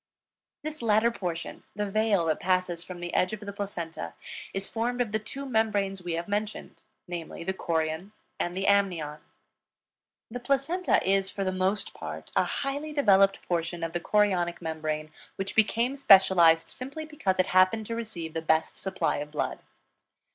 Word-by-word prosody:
This 310 Hz, -1 st, -5 dB
latter 225 Hz, +1 st, +3 dB
portion, 175 Hz, -6 st, -4 dB
the 210 Hz, 0 st, -1 dB
veil 205 Hz, -3 st, +2 dB
that 155 Hz, -2 st, +1 dB
passes 185 Hz, -2 st, 0 dB
from 180 Hz, -1 st, -8 dB
the 175 Hz, 0 st, -5 dB
edge 185 Hz, +3 st, +2 dB
of 215 Hz, -, -4 dB
the 200 Hz, -1 st, -6 dB
placenta, 170 Hz, -, -5 dB, 0.4 s
is 195 Hz, 0 st, -1 dB
formed 240 Hz, +2 st, -2 dB
of 240 Hz, -4 st, 0 dB
the 215 Hz, -, +1 dB
two 275 Hz, +6 st, -7 dB
membranes 205 Hz, -6 st, 0 dB
we 175 Hz, -1 st, -3 dB
have 170 Hz, +1 st, -3 dB
mentioned, 210 Hz, +1 st, -3 dB, 0.3 s
namely, 170 Hz, -2 st, -6 dB
the 190 Hz, -, -1 dB
chorion 160 Hz, +1 st, -2 dB, 0.3 s
and 175 Hz, +1 st, -2 dB
the 195 Hz, -, -1 dB
amnion. 175 Hz, -7 st, +2 dB, 1.1 s
The 245 Hz, -, -4 dB
placenta 275 Hz, -, +1 dB
is, 195 Hz, 0 st, +3 dB
for 195 Hz, +1 st, -3 dB
the 185 Hz, -, 0 dB
most 190 Hz, +2 st, 0 dB
part, -, -, -7 dB
a -, -, +4 dB
highly 285 Hz, +2 st, -3 dB
developed 195 Hz, -9 st, +4 dB
portion 170 Hz, 0 st, -1 dB
of 165 Hz, 0 st, -3 dB
the 175 Hz, -, 0 dB
chorionic 185 Hz, -3 st, +2 dB
membrane, 155 Hz, -2 st, -3 dB, 0.2 s
which 195 Hz, +1 st, -4 dB
became 230 Hz, +4 st, +2 dB
specialized 190 Hz, -9 st, +6 dB
simply 280 Hz, +5 st, -6 dB
because 300 Hz, -12 st, -1 dB
it 185 Hz, -, +4 dB
happened 185 Hz, +4 st, +4 dB
to 230 Hz, -, -4 dB
receive 190 Hz, -9 st, -5 dB
the 165 Hz, -, -2 dB
best 160 Hz, 0 st, +1 dB
supply 190 Hz, -1 st, -1 dB
of 145 Hz, +1 st, -5 dB
blood. 150 Hz, -, -2 dB
195 Hz, 170 wpm, -28 LUFS, 170-220 Hz, 1.1 s, specialized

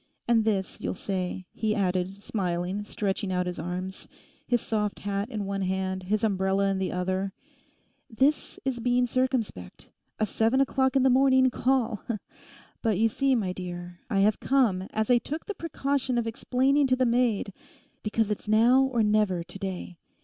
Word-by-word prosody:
And 230 Hz, -2 st, +3 dB
this, 195 Hz, -4 st, -1 dB
you'll -, -, -2 dB
say,' 185 Hz, -1 st, -3 dB
he 215 Hz, -1 st, 0 dB
added, 190 Hz, 0 st, -1 dB
smiling, 185 Hz, 0 st, -2 dB
stretching 200 Hz, -2 st, -2 dB
out 180 Hz, 0 st, 0 dB
his 180 Hz, -2 st, -4 dB
arms, 180 Hz, +3 st, -5 dB, 0.4 s
his 240 Hz, -1 st, +2 dB
soft 210 Hz, -2 st, -2 dB
hat 200 Hz, +2 st, -2 dB
in 215 Hz, -5 st, -3 dB
one 195 Hz, 0 st, -2 dB
hand, 190 Hz, 0 st, -1 dB
his 210 Hz, +4 st, -1 dB
umbrella 195 Hz, -1 st, +2 dB
in 195 Hz, -, -1 dB
the 190 Hz, -, -1 dB
other—'this 220 Hz, +8 st, -3 dB
is 260 Hz, -3 st, -1 dB
being 245 Hz, +1 st, +2 dB
circumspect—a 230 Hz, -, -3 dB
seven 225 Hz, +5 st, +1 dB
o'clock 265 Hz, -1 st, +2 dB
in 265 Hz, -, +4 dB
the 265 Hz, -, +5 dB
morning 260 Hz, 0 st, +5 dB
call! 245 Hz, -5 st, +1 dB, 0.8 s
But 220 Hz, -5 st, +1 dB
you 225 Hz, +2 st, +3 dB
see, 270 Hz, +4 st, +2 dB
my 195 Hz, -6 st, -1 dB
dear, 175 Hz, -1 st, -7 dB
I 195 Hz, -4 st, +2 dB
have 210 Hz, +2 st, +3 dB
come, 220 Hz, -9 st, +2 dB
as 220 Hz, +2 st, 0 dB
I 245 Hz, -, +6 dB
took 305 Hz, +7 st, -5 dB
the 415 Hz, -, -4 dB
precaution 275 Hz, -7 st, -1 dB
of 235 Hz, -, +1 dB
explaining 265 Hz, +5 st, +2 dB
to 255 Hz, -, +3 dB
the 255 Hz, 0 st, +2 dB
maid, 235 Hz, -5 st, +1 dB, 0.5 s
because 215 Hz, 0 st, 0 dB
it's 210 Hz, -, -4 dB
now 230 Hz, +5 st, +5 dB
or 260 Hz, -4 st, +2 dB
never 210 Hz, -4 st, +2 dB
to 175 Hz, +3 st, -10 dB
day. 185 Hz, -2 st, -5 dB
215 Hz, 165 wpm, -27 LUFS, 190-250 Hz, 0.8 s, I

